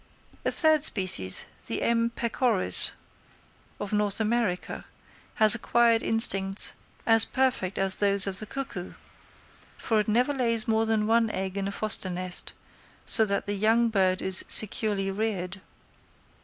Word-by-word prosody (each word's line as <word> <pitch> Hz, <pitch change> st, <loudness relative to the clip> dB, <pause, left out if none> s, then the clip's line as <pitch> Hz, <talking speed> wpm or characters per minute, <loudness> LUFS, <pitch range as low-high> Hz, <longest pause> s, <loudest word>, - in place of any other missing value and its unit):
A -, -, -1 dB
third 315 Hz, -3 st, +3 dB
species, 185 Hz, -, +1 dB, 0.2 s
the -, -, -3 dB
M. 230 Hz, 0 st, 0 dB
pecoris 235 Hz, -3 st, -1 dB, 0.9 s
of 205 Hz, 0 st, -7 dB
North 210 Hz, -1 st, -1 dB
America, 220 Hz, -4 st, -3 dB, 0.5 s
has 215 Hz, 0 st, +7 dB
acquired 235 Hz, 0 st, +1 dB
instincts 195 Hz, -3 st, +3 dB, 0.3 s
as 225 Hz, -1 st, +7 dB
perfect 255 Hz, -8 st, -3 dB
as 195 Hz, -1 st, +1 dB
those 200 Hz, -1 st, -1 dB
of 195 Hz, -1 st, -6 dB
the 215 Hz, -, -9 dB
cuckoo, 240 Hz, -9 st, -7 dB, 0.8 s
for 220 Hz, -2 st, -2 dB
it 210 Hz, -, -3 dB
never 245 Hz, +6 st, 0 dB
lays 230 Hz, -4 st, -1 dB
more 225 Hz, 0 st, 0 dB
than 220 Hz, -1 st, -1 dB
one 225 Hz, +1 st, +1 dB
egg 190 Hz, -2 st, -5 dB
in 195 Hz, -1 st, -4 dB
a -, -, -5 dB
foster 210 Hz, -2 st, -3 dB
nest, 180 Hz, 0 st, -5 dB, 0.5 s
so 225 Hz, -, 0 dB
that 200 Hz, -1 st, -3 dB
the 205 Hz, -, -3 dB
young 225 Hz, +3 st, 0 dB
bird 190 Hz, -3 st, -1 dB
is 190 Hz, 0 st, +3 dB
securely 205 Hz, -2 st, +4 dB
reared. 195 Hz, -3 st, -5 dB
215 Hz, 140 wpm, -25 LUFS, 195-230 Hz, 0.9 s, has